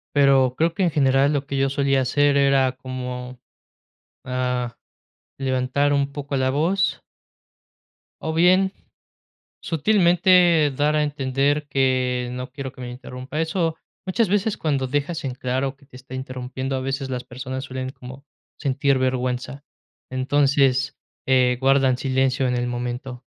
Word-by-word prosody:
pero 135 -2 +4
creo 165 +1 +2
que 195 - -3
en 175 - +3
general 135 0 +3
lo 140 -1 -1
que 140 -1 -3
yo 135 0 +2
solía 135 -1 +1
hacer 140 +2 +2
era 135 -2 +3
como, 125 -1 -6 0.9
ah, 125 -2 -2 0.6
levantar 130 +2 +1
un 140 0 +1
poco 140 -1 -4
la 130 0 +1
voz 180 +7 +1 1.2
o 160 - -2
bien, 185 +3 +4 0.9
sutilmente 175 -2 +4
dar 150 +2 +2
a 150 - +3
entender 145 +1 0
que 130 -2 +1
no 125 +1 -6
quiero 135 -1 -6
que 130 - -12
me 125 - -5
interrumpa. 130 +3 -7
Eso 165 0 -1 0.3
muchas 195 +2 +1
veces 205 +2 +1
cuando 140 -4 -1
dejas 145 +4 -2
en 130 - -2
claro 130 +2 -2
que 140 0 -23
te 130 - -18
está 130 0 -10
interrumpiendo, 130 +1 -4
a 130 - -2
veces 135 0 -3
las 125 -1 -3
personas 130 +1 -6
suelen 130 0 -5
como 130 +2 -11 0.3
sentir 140 0 +1
vergüenza. 130 +1 -2 0.5
Entonces, 135 0 +2 0.3
eh, 125 -1 +3
guardan 135 -1 +3
silencio 130 0 +1
en 125 - 0
el 120 0 -1
momento. 125 +1 -5
135 Hz, 145 wpm, -23 LUFS, 130-145 Hz, 1.2 s, pero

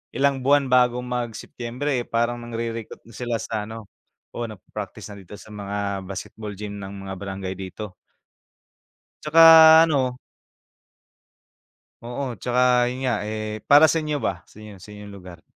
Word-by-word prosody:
ilang 135 0 +1
buwan 140 0 +2
bago 125 -1 +3
mag-Setyembre, 125 +2 -4
eh, 120 - -5
parang 120 +1 -1
nangre-recruit 115 -1 -6
na 115 - -17
sila 120 +1 -4
sa 105 -2 -4
ano, 110 -2 -10 0.4
oo, 120 - -4
nagpa-practice 105 0 -9
na 100 - -10
dito 95 +2 -12
sa 110 - -14
mga 100 -2 -4
basketball 105 +2 -7
gym 105 0 -7
ng 100 0 -8
mga 95 - -5
barangay 95 -1 -5
dito. 95 +1 -8 1.3
'Tsaka, 160 0 +8
ano 135 -6 0 1.9
Oo, 125 +2 -5
'tsaka 125 +2 +2
'yon 130 +2 -5
nga. 125 -2 +1
Eh, 110 0 -5
para 145 +2 +8
sa 160 +1 +3
inyo 150 -1 -2
ba, 95 -3 -2
sa - - -22
inyo 105 -3 -12
sa 105 - -14
inyong 105 0 -11
lugar? 90 -3 -12
115 Hz, 150 wpm, -23 LUFS, 105-125 Hz, 1.9 s, Tsaka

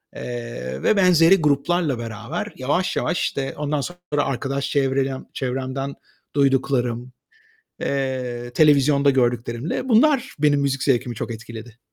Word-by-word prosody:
eee, 115 - -6
ve - - +4
benzeri 180 -1 +6
gruplarla 150 0 +1
beraber 115 -1 -5
yavaş 145 +8 0
yavaş - - 0
işte 135 -1 -2
ondan 150 0 -1
sonra 175 -2 -3
arkadaş 135 +1 -2
çevrerem 135 -1 0
çevremden 135 +1 -3 0.4
duyduklarım, 130 -3 +1 0.7
eee, 130 -3 -2
televizyonda 140 -2 +4
gördüklerimle 120 - -1
bunlar 260 +2 +3
benim 145 -1 +3
müzik 135 -1 0
zevkimi 125 -2 +1
çok 115 - -4
etkiledi. 115 +1 -10
135 Hz, 115 wpm, -22 LUFS, 120-145 Hz, 0.7 s, benzeri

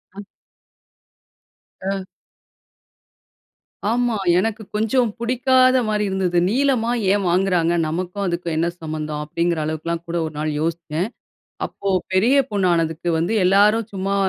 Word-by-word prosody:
ம். 205 0 -9 1.6
ஆ. 195 -1 -2 1.8
ஆமா! 240 -1 +1 0.2
எனக்கு 220 +3 0
கொஞ்சம் 225 +2 +2
பிடிக்காத 255 +1 +3
மாரி 210 -1 0
இருந்தது. 185 -2 0
"நீலமா 250 -1 +1 0.2
ஏன் 200 -1 +1
வாங்குறாங்க 175 -2 +2
நமக்கும் 180 +5 -3
அதுக்கும் 170 -1 -2
என்ன 170 +1 +1
சம்மந்தம்" 155 -1 -4
அப்பிடிங்கிற 170 +2 -1
அளவுக்குலாம் 165 +2 -3
கூட 170 +1 -2
ஒரு 155 - -6
நாள் 155 0 -1
யோசிச்தேன். 165 +2 -2 0.6
அப்போ 200 - -5 0.2
பெரிய 230 +9 +4
பொண்ணு 200 -3 +1
ஆனதுக்கு 165 +1 -1
வந்து 170 +7 0
எல்லாரும் 210 +4 +4
சும்மா 195 +1 -1
190 Hz, 120 wpm, -21 LUFS, 170-220 Hz, 1.8 s, பெரிய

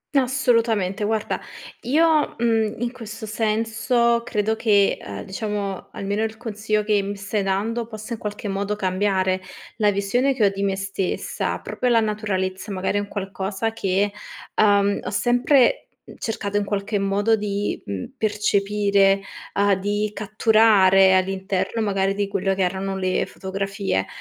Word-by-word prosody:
Assolutamente. 230 -7 +2
Guarda 215 0 -1 0.4
io, 310 +4 +3
mhmm, 225 -2 +1
in 240 -1 -1
questo 225 -3 -8
senso 225 +2 +1
credo 220 -2 0
che, 205 -3 +3
ehm, 100 0 -7
diciamo 200 - -4
almeno 200 +2 -2
il 220 0 -3
consiglio 215 -2 -2
che 210 -1 +2
mi 200 +1 -4
stai 200 +1 -2
dando 215 +5 -1
possa 220 0 -7
in 225 - -5
qualche 210 0 -5
modo 200 +1 -2
cambiare, 190 -1 0 0.4
la 210 -2 +3
visione 205 +8 +1
che 235 -5 +2
ho - - +5
di 195 0 -4
me 195 -1 +1
stessa, 195 -1 -2
proprio 250 - -2
la 230 - +5
naturalezza, 205 -2 -2
magari 190 +1 -1
è - - +1
un 205 - -6
qualcosa 195 +2 -3
che, 200 -2 0 0.4
ehm, 200 -1 +3
ho - - -3
sempre, 245 - +3 0.2
mhmm, - - -13
cercato 205 -2 -3
in 205 - 0
qualche 205 +1 -2
modo 200 +3 +2
di, 205 -1 -2
mhmm, 100 -2 -4
percepire, 200 -2 +2 0.3
uhm, 200 0 +3
di 205 +2 -1
catturare, 210 -3 +4
all'interno 190 +3 0
magari 195 -1 0
di 200 0 -1
quello 195 0 0
che 190 - +1
erano 190 +1 -2
le 185 -1 0
fotografie. 195 - -3
205 Hz, 150 wpm, -23 LUFS, 195-220 Hz, 0.4 s, ho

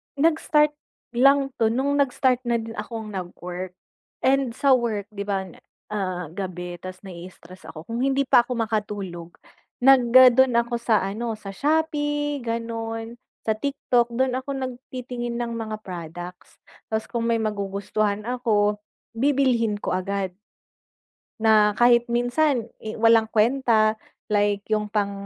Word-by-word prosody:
Nag-start 300 0 +3 0.4
lang 275 +2 +4
'to, 225 - +4
no'ng 275 +5 0
nag-start 255 -2 +2
na 235 - +2
din 225 0 -7
akong 220 0 -6
nag-work, 180 -1 -6 0.5
and 265 -2 +2
sa 275 0 +2
work, 225 -5 +1
'di 200 -1 -5
ba 195 -1 -1 0.5
ah, 185 -5 -3
gabi 180 -2 -6
tas 185 0 -8
na-i-istress 185 0 -11
ako, 155 - -9
kung 230 +1 -4
hindi 275 0 +2
pa 240 - +6
ako 250 - -4
makatulog 205 -6 -3 0.5
nag 255 -2 +5
ah, 255 -1 +9
do'n 260 0 +4
ako 235 +1 0
sa 220 -4 +2
ano 220 +3 -3
sa 195 -2 -8
Shopee 295 -2 0
gano'n, 230 0 -4 0.3
sa 220 - +3
TikTok 245 -2 0
do'n 255 +2 0
ako 260 +2 -5
nagtitingin 250 -2 -5
ng 235 -1 -3
mga 220 -2 -4
products 175 0 -8 0.3
'tas 220 0 -1
kung 235 -1 -3
may 230 -1 +2
magugustuhan 205 0 -2
ako, 210 -4 +1 0.4
bibilhin 250 -4 +2
ko - - -2
agad, 190 0 -2 1.1
na 215 -1 +5
kahit 240 0 +5
minsan 245 +2 +1 0.2
eh, 220 - -5
walang 225 -1 +5
kwenta 225 -1 +3 0.4
like 205 -1 +1
'yong 210 -1 0
pang 200 -1 0
225 Hz, 140 wpm, -24 LUFS, 205-250 Hz, 1.1 s, ah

